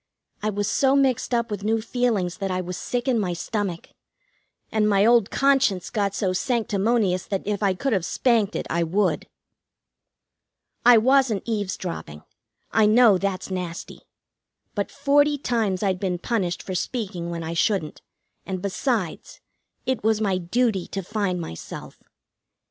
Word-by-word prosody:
I 215 - 0
was 205 -1 -1
so 270 +5 +3
mixed 265 -4 +2
up 235 -2 0
with 200 -1 -4
new 225 +2 +1
feelings 220 -6 -1
that 195 -2 -3
I 185 0 -1
was 180 0 -4
sick 245 +6 -3
in 245 -3 +2
my 180 -4 -1
stomach, 185 -1 -3 0.8
and 215 -1 +2
my 200 0 +4
old 235 -3 +4
conscience 270 -10 +2
got 200 -3 -1
so 185 -3 0
sanctimonious 210 -2 0
that 195 -2 -3
if 205 0 -2
I 195 -2 +2
could 270 +6 -1
have 190 -4 +1
spanked 220 +1 +1
it - - -2
I 170 - 0
would. 185 +5 0 1.6
I 245 -1 +8
wasn't 255 -2 +3
eavesdropping; 185 - -4 0.5
I 220 -1 +4
know 215 -3 +6
that's 195 -1 -3
nasty. 180 -2 -5 0.7
But 205 -1 -2
forty 290 +1 +2
times 220 -8 -1
I'd 190 -2 0
been 185 -2 -1
punished 180 -3 -2
for 190 - -5
speaking 185 -3 -3
when 170 -1 -4
I 160 +1 -4
shouldn't, 175 -2 0 0.4
and, 190 -1 -4
besides, 200 - -2 0.5
it 260 -4 -1
was 220 0 +2
my 195 -4 +1
duty 195 +1 0
to 195 - -4
find 200 -2 -1
myself. 120 - -8
205 Hz, 155 wpm, -24 LUFS, 185-235 Hz, 1.6 s, I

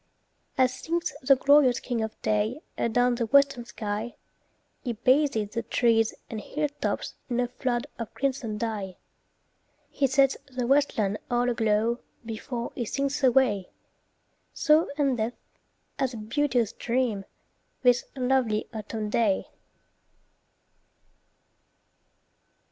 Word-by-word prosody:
As 255 -1 +4
sinks 335 +6 -2
the 275 +1 +6
glorious 275 -2 +5
"King 240 -3 -2
of 220 0 -4
Day" 215 +6 0
Adown 245 +2 +2
the 235 -1 -1
western 275 -1 +4
sky, 215 +1 -4 0.7
He 245 - -2
bathes 255 -3 +2
the 230 - -1
trees 225 -1 +2
and 220 -2 -5
hilltops 295 +5 -3 0.2
in 245 -1 0
A 245 - +1
flood 240 -1 -2
of 230 - -5
crimson 255 -6 -2
dye. 205 -5 -3 0.9
He 275 - +1
sets 270 0 +3
the 255 -2 -3
westland 235 -7 +2
all 245 0 +2
aglow 225 +1 +1 0.3
Before 235 +2 -5
he 240 - -3
sinks 280 +4 -2
away; 245 -7 +3 0.9
So 310 +2 +4
endeth, 245 -5 0 0.6
as 260 -2 0
a - - -6
beauteous 240 +1 0
dream, 235 -4 -1 0.6
This 245 -1 +4
lovely 250 -4 +1
autumn 215 0 -4
day. 215 -5 +1
240 Hz, 115 wpm, -27 LUFS, 220-265 Hz, 0.9 s, the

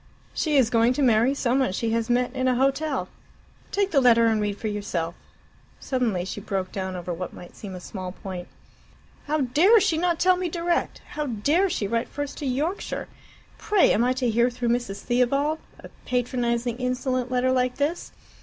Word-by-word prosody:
She 300 -3 +1
is 240 -4 +4
going 230 +1 +4
to 280 - 0
marry 240 +2 +4
some 260 -1 +1
one 260 -8 +1
she 225 +3 -1
has 230 0 0
met 245 +1 +1
in 260 0 0
a 255 - +3
hotel. 275 +3 0 0.6
Take 400 -1 0
the 280 -5 +4
letter 235 -2 +5
and 220 -2 +2
read 205 -1 -2
for 220 - -4
yourself." 195 -5 -3 0.7
Suddenly 230 -9 -1
she 195 +2 -5
broke 195 -3 -3
down 190 -1 -4
over 175 0 -4
what 180 +2 -5
might 175 - -12
seem 195 -3 -8
a - - -7
small 185 0 -6
point. 180 -2 -7 0.8
"How 305 +1 +1
dare 320 - +5
she 325 -5 +1
not 345 -1 +1
tell 365 0 +4
me 360 -1 -2
direct! 340 +1 -1
How 300 -1 -3
dare 290 - +1
she 210 - -1
write 230 +2 -1
first 290 -1 -5
to 285 - -3
Yorkshire! 300 +10 -2 0.5
Pray, 420 -3 +3
am 225 - +2
I 250 +1 +2
to 255 -1 -1
hear 235 +2 +3
through 240 -1 -2
Mrs. 235 -5 -1
Theobald 275 +6 +1 0.2
a - - -12 0.2
patronizing, 240 -1 0
insolent 255 0 -1
letter 255 0 +1
like 250 -1 +1
this? 295 +5 -2
250 Hz, 190 wpm, -25 LUFS, 220-285 Hz, 0.8 s, letter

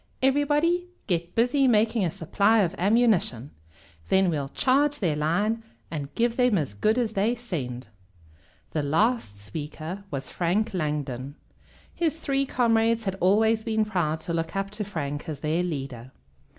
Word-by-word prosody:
Everybody 295 +6 +2 0.2
get 175 -1 -2
busy 255 +4 +3
making 225 -1 +3
a 175 - +1
supply 200 +6 +2
of 180 -2 0
ammunition. 195 - +2 0.6
Then 190 -2 +4
we'll 140 -3 -2
charge 285 - +2
their 170 - 0
line, 180 +10 0 0.3
and 145 -3 -4
give 235 0 +1
them 250 -5 +3
as 145 - -2
good 215 - +1
as 230 -3 0
they 215 +4 +1
send!" 135 - -5 0.9
The 155 - 0
last 160 - +1
speaker 155 - -6
was 135 -2 -4
Frank 200 +6 0
Langdon. 145 -5 -3 0.6
His 325 -2 -1
three 275 -2 0
comrades 230 -2 +2
had 195 - 0
always 220 +4 +3
been 220 -1 +1
proud 160 -6 -1
to 170 - -4
look 165 +2 -2
up 195 0 -2
to 210 0 -4
Frank 150 -7 -4
as 145 -3 -5
their 160 +3 0
leader. 135 -7 -5
195 Hz, 150 wpm, -26 LUFS, 155-230 Hz, 0.9 s, Then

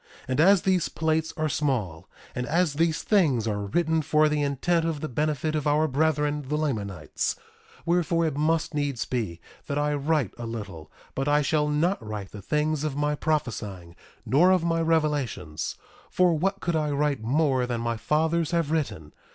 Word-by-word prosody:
1:2 - - -20
And 130 +2 0
as 190 +3 +6
these 185 -3 +2
plates 160 0 0
are 155 0 0
small, 125 - -2 0.2
and 125 0 -3
as 170 +1 +2
these 160 +1 0
things 145 - +2
are 105 -2 -1
written 160 +7 +1
for 155 0 +3
the 150 -1 0
intent 145 +4 +1
of 165 -2 -1
the 155 - -3
benefit 150 +2 -1
of 150 -1 -1
our 150 +2 +3
brethren 150 0 +1
the 150 +2 -1
Lamanites, 110 - -2 0.5
wherefore, 170 -1 +2
it 155 -4 -1
must 160 +2 0
needs 145 -5 -1
be 110 -10 -3 0.3
that 140 - -2
I 150 0 +1
write 145 - 0
a 120 - -4
little; 100 -9 -7 0.2
but 135 +1 -2
I 145 0 +3
shall 150 +1 +1
not 155 - 0
write 105 -2 -6
the 105 - -9
things 150 +7 0
of 150 -3 -2
my 150 +1 0
prophesying, 105 - -3 0.3
nor 160 +8 +4
of 185 -2 +3
my 165 -1 +1
revelations. 145 - -1 0.3
For 180 -2 +3
what 195 +5 -1
could 170 -2 -1
I 155 -1 0
write 145 -3 0
more 130 +1 +1
than 120 -2 -2
my 115 0 -1
fathers 160 +7 +1
have 165 -3 0
written? 130 - -2
150 Hz, 185 wpm, -26 LUFS, 125-160 Hz, 0.5 s, as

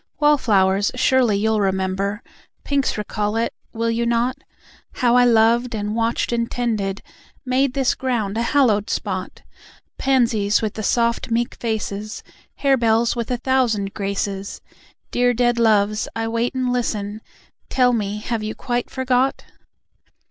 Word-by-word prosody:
Wallflowers, 205 -10 +3
surely 250 -4 +3
you'll 220 +1 +1
remember, 190 +2 -1 0.4
Pinks, 280 -4 0
recall 210 0 -2
it, 230 +1 0 0.2
will 230 0 -1
you 230 +1 0
not? 235 +2 +1 0.6
How 245 -2 +2
I 250 0 +6
loved 235 +1 +3
and 210 0 -3
watched 230 +1 0
and 235 -1 -1
tended, 210 -5 -2 0.4
Made 260 +1 +1
this 270 -2 +2
ground 230 -6 -2
a 230 - 0
hallowed 235 -5 +2
spot: 185 -2 -4 0.6
Pansies, 230 -6 +2
with 215 -2 -2
the 220 - -5
soft 235 +2 0
meek 235 +1 0
faces, 215 -2 -4 0.4
Harebells, 235 -4 +3
with 235 -1 -3
a 250 - 0
thousand 235 -6 0
graces: 200 -1 -3 0.5
Dear 245 0 +2
dead 240 0 +2
loves, 215 -2 +2
I 225 0 -2
wait 230 +3 -1
and 255 -1 0
listen. 215 -3 -2 0.5
Tell 250 -1 +3
me, 210 -2 -2
have 230 0 -2
you 215 +1 -4
quite 245 -1 -2
forgot? 260 0 0
230 Hz, 140 wpm, -21 LUFS, 210-245 Hz, 0.6 s, I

